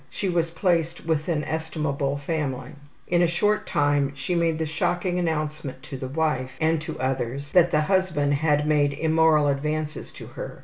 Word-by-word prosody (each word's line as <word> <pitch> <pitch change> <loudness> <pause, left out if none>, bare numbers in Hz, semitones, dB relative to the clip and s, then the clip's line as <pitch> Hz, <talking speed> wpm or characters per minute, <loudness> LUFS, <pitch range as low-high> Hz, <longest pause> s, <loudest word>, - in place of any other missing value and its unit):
She 195 - -3
was 170 -2 +1
placed 170 -1 0
with 160 -2 0
an 155 -3 0
estimable 150 -3 -2
family. 140 -4 -3 0.3
In 175 0 +2
a 175 - +5
short 210 +5 +1
time 145 -1 +1
she 140 +6 -3
made 165 -2 +1
the 160 - -1
shocking 175 +3 -1
announcement 150 -5 -3
to - - -7
the 130 - -5
wife, 135 -3 -1
and 160 0 +2
to 160 - -6
others, 130 +1 -2
that 175 -1 +5
the 150 -2 +2
husband 155 -4 +1
had 150 0 +2
made 145 -2 +2
immoral 160 0 +3
advances 150 +2 -2
to - - -10
her. - - -8
155 Hz, 175 wpm, -25 LUFS, 145-165 Hz, 0.3 s, a